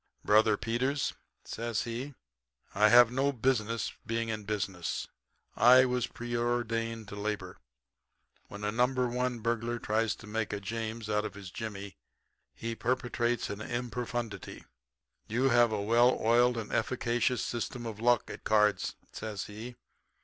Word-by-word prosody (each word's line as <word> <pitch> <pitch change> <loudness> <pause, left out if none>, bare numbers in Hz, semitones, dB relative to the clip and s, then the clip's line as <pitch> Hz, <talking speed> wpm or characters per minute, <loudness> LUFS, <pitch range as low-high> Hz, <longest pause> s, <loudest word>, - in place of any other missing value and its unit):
"'Brother 110 0 +5
Peters,' 130 +6 -1 0.3
says 115 -1 -2
he, 125 +4 -5 0.6
'I 105 +2 +5
have 120 0 +8
no 135 +3 +1
business 115 -3 0
being 115 0 -2
in 110 -2 -4
business. 95 -6 -2 0.5
I 125 +2 +7
was 125 -1 0
preordained 120 -2 -2
to 100 - -7
labor. 105 0 -4 0.9
When 100 +1 -9
a 105 - 0
No. 120 +3 +3
1 125 -1 -1
burglar 115 +1 -1
tries 110 0 0
to - - -13
make 110 0 -2
a 105 - -2
James 110 +2 -4
out 105 0 +1
of 105 - -5
his 100 -3 -9
jimmy 100 -4 -6 0.6
he 115 0 -4
perpetrates 120 -1 -1
an 100 - -5
improfundity. 120 -3 -4 0.6
You 125 +5 +2
have 120 -2 +5
a 105 - -1
well 120 +4 +4
oiled 120 +2 +4
and 110 -2 -5
efficacious 120 +1 0
system 120 0 -4
of 110 -2 -6
luck 120 +1 +3
at - - -9
cards,' 105 -3 +2 0.2
says 105 -3 -5
he. 110 +4 -8
115 Hz, 140 wpm, -30 LUFS, 105-120 Hz, 0.9 s, have